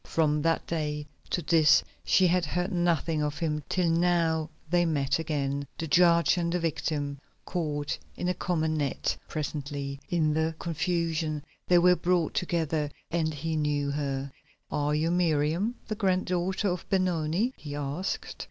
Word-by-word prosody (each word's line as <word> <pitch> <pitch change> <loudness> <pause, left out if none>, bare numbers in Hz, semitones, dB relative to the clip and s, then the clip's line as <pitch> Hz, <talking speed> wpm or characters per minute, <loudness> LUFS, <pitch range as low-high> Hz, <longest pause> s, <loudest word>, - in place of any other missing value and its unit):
From 150 -2 +2
that 165 +1 +1
day 150 -2 -2 0.2
to 175 - -1
this 155 -3 +5 0.2
she 185 - +4
had 180 0 +3
heard 180 +5 -1
nothing 170 -3 +1
of 150 0 -1
him 150 -2 -1
till 180 -2 +1
now 165 -2 +2 0.2
they 175 +2 +3
met 140 -3 +1
again, 140 -3 -2
the 165 - -3
judge 170 +2 +4
and 170 -1 0
the 180 - 0
victim, 145 -3 -2 0.3
caught 150 -5 -2 0.2
in 180 - -2
a 180 - +2
common 160 -3 0
net. 140 -3 -1
Presently, 145 -2 -4
in 155 -3 +2
the 160 +1 0
confusion 165 -2 -1 0.2
they 180 - +5
were 180 +1 +6
brought 175 -2 +1
together 160 -4 0 0.2
and 165 -2 +1
he 160 +2 -3
knew 145 -2 0
her. 140 -1 -2 0.4
"Are 150 0 +1
you 160 +2 +1
Miriam, 170 +5 +1
the 215 - -2
grand 190 -4 +1
daughter 185 +3 0
of 180 -1 -4
Benoni?" 185 +4 +1
he 145 -2 -7
asked. 145 +6 -3
160 Hz, 155 wpm, -28 LUFS, 150-175 Hz, 0.4 s, were